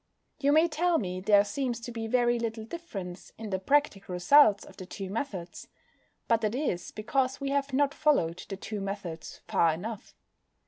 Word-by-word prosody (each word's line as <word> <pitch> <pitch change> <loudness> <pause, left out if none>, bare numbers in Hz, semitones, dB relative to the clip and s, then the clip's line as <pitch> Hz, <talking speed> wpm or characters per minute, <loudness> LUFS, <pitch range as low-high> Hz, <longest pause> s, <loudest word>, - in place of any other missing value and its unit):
You 285 0 +3
may 315 +3 +5
tell 335 +2 +1
me 185 -6 -3
there 200 +1 +5
seems 240 +2 -2
to 240 - -6
be 225 -1 -4
very 240 0 +2
little 225 -1 -3
difference 200 - -7
in 220 -2 -7
the 190 - 0
practical 200 -5 +1
results 205 +3 +5
of - - -15
the 185 - -8
two 195 -1 -6
methods. 195 -7 -5 0.6
But 230 -1 +3
that 215 +1 0
is 260 - -2
because 255 +4 -1
we 275 -1 -2
have 280 0 0
not 280 +1 +2
followed 180 - +1
the 195 - -4
two 210 +1 -5
methods 195 -5 -6
far 165 - +3
enough. 210 +6 -7
225 Hz, 180 wpm, -29 LUFS, 195-275 Hz, 0.6 s, may